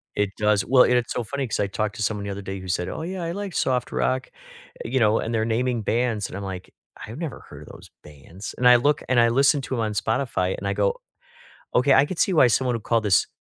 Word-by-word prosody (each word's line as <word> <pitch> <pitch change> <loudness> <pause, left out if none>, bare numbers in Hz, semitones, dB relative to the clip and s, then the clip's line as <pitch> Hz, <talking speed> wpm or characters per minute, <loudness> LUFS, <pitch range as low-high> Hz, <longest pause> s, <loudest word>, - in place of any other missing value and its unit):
It 105 -1 -1
does. 105 -2 +1
Well, 130 0 +6
it 125 - +2
it's 120 -3 -2
so 120 - -2
funny 135 +3 -4
'cause - - -3
I 100 - +1
talked 105 +1 -3
to 110 - -3
someone 105 0 -2
the - - -4
other 100 +1 -6
day 95 0 -6
who 95 - -9
said, 90 0 -2
"Oh, - - -5
yeah. 180 0 -5
I 165 - -3
like 200 -1 -5
soft 125 -2 0
rock", 130 0 -1 0.5
you 130 +2 -1
know, 110 -1 +3
and 115 - -3
they're 110 0 +1
naming 120 +1 0
bands, 115 -1 -1
and - - -10
I'm 100 - -5
like, 95 -1 -7 0.3
"I've 115 +6 -9
never 160 -7 -5
heard - - -11
of - - -14
those - - -14
bands". 75 +6 -10
And 125 - +3
I 125 - +8
look 145 +4 +2
and 130 -2 +3
I 115 0 +5
listen 140 +3 +3
to 130 - -4
'em - - -3
on 110 -1 -1
Spotify, 110 -4 -1
and 100 - -5
I 100 - 0
go, 100 0 0 0.8
"Okay, 135 +2 +4
I 140 - +6
could 170 +3 -6
see 190 - +2
why 130 -5 +6
someone 125 +1 +1
would 110 - -8
call 115 -1 +1
this 105 -4 +2
115 Hz, 270 wpm, -24 LUFS, 100-130 Hz, 0.8 s, I